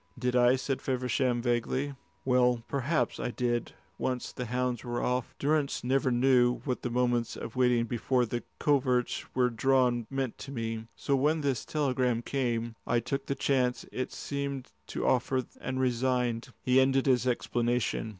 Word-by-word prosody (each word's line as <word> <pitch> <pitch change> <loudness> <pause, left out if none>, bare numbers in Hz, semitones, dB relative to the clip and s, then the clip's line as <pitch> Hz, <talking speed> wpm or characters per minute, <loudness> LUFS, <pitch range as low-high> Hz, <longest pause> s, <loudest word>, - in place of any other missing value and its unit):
"Did 125 0 -1
I?" 125 +1 +5
said 130 +1 -2
Feversham, 125 -1 0
vaguely. 125 +3 0 0.3
"Well, 125 -2 +3
perhaps 140 +4 0
I - - -1
did, 120 -1 -1 0.3
once 125 -1 -2
the 125 - -5
hounds 125 0 -1
were 120 -1 -2
off. 125 -1 -1
Durrance 145 0 0
never 130 +1 +2
knew 125 0 +4
what 125 -3 -2
the - - -2
moments 120 -1 0
of 115 - -7
waiting 125 -2 +3
before 125 +2 +1
the 120 +1 -3 0.2
coverts 130 -4 +1
were 125 -1 +3
drawn 125 -1 +2
meant 135 -3 -3
to 135 - -7
me! 115 -3 -4
So 140 - 0
when 150 +4 +2
this 140 -4 -1
telegram 130 -5 0
came, 120 -4 -1
I 120 - +3
took 135 +4 -3
the 140 - -1
chance 130 -2 +1
it 130 - -3
seemed 140 - -4 0.2
to - - -3
offer 130 +1 +2 0.2
and 130 0 -3
resigned." 125 -2 0
He 130 +1 +4
ended 135 0 +3
his 130 -2 +3
explanation. 120 -2 0
125 Hz, 160 wpm, -30 LUFS, 120-135 Hz, 0.3 s, I